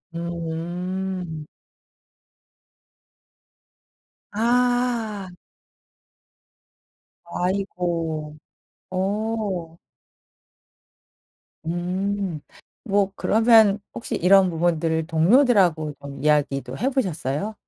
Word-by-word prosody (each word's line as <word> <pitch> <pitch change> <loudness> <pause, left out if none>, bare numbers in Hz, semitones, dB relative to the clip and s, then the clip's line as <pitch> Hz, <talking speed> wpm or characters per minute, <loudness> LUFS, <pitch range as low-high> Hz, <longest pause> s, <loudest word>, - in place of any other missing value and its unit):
음. 170 0 -4 2.9
아. 235 -3 +1 2.1
아이고 170 -5 -2 0.6
어. 195 -3 -2 1.9
음. 180 +1 -2 0.5
뭐 200 -2 +1
그러면 220 -2 +5
혹시 - - -4
이런 190 +1 +5
부분들을 165 -1 0
동료들하고 175 - +3
좀 140 0 -8
이야기도 140 -3 +1
해 255 - +1
보셨어요? 190 - -2
180 Hz, 115 characters per minute, -23 LUFS, 165-205 Hz, 2.9 s, 그러면